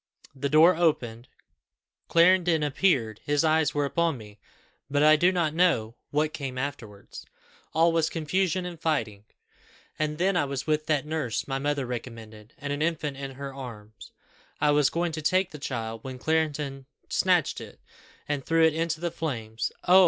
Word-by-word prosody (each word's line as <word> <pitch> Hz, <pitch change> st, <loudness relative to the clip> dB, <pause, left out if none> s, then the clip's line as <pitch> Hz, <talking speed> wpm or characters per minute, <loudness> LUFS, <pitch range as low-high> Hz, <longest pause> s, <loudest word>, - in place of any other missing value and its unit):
The 140 Hz, +1 st, -3 dB
door 160 Hz, +5 st, +6 dB
opened, 125 Hz, -8 st, 0 dB, 0.8 s
Clarendon 170 Hz, -2 st, +4 dB
appeared 135 Hz, -, +1 dB
his 145 Hz, +1 st, +1 dB
eyes 155 Hz, -2 st, +2 dB
were 145 Hz, -1 st, +1 dB
upon 165 Hz, 0 st, 0 dB
me; 105 Hz, -2 st, -13 dB, 0.5 s
but 145 Hz, +1 st, +2 dB
I 155 Hz, 0 st, +7 dB
do 175 Hz, +4 st, +4 dB
not 170 Hz, -4 st, 0 dB
know 160 Hz, -11 st, +2 dB, 0.2 s
what 150 Hz, +1 st, 0 dB
came 135 Hz, -3 st, -5 dB
afterwards; 125 Hz, -7 st, -6 dB, 0.5 s
all 165 Hz, +1 st, +5 dB
was 165 Hz, -1 st, +1 dB
confusion 180 Hz, +3 st, 0 dB
and 170 Hz, -2 st, -7 dB
fighting. 110 Hz, -10 st, -1 dB, 0.7 s
And 150 Hz, 0 st, -1 dB
then 190 Hz, +3 st, +1 dB
I 160 Hz, -, +2 dB
was 140 Hz, -1 st, -4 dB
with 155 Hz, 0 st, 0 dB
that 150 Hz, -2 st, +1 dB
nurse 150 Hz, -7 st, -2 dB
my 135 Hz, -1 st, -2 dB
mother 145 Hz, -1 st, -1 dB
recommended, 115 Hz, -3 st, -8 dB
and 145 Hz, 0 st, -4 dB
an 145 Hz, -, -3 dB
infant 155 Hz, -3 st, -1 dB
in 135 Hz, -1 st, -6 dB
her 140 Hz, 0 st, -6 dB
arms. 110 Hz, -8 st, -10 dB, 0.5 s
I 150 Hz, -, +3 dB
was 145 Hz, -2 st, +4 dB
going 170 Hz, +1 st, -1 dB
to 155 Hz, 0 st, -5 dB
take 185 Hz, +4 st, +1 dB
the 150 Hz, -, -9 dB
child, 115 Hz, -5 st, -4 dB
when 130 Hz, -1 st, -6 dB
Clarendon 145 Hz, -2 st, -1 dB, 0.2 s
snatched -, -, +1 dB
it, -, -, -11 dB, 0.5 s
and 145 Hz, -2 st, -2 dB
threw 165 Hz, +2 st, +2 dB
it 160 Hz, -, +3 dB
into 165 Hz, 0 st, -1 dB
the 170 Hz, 0 st, -2 dB
flames. 115 Hz, -9 st, -3 dB, 0.2 s
Oh! 185 Hz, +2 st, +8 dB
150 Hz, 170 wpm, -27 LUFS, 130-165 Hz, 0.8 s, Oh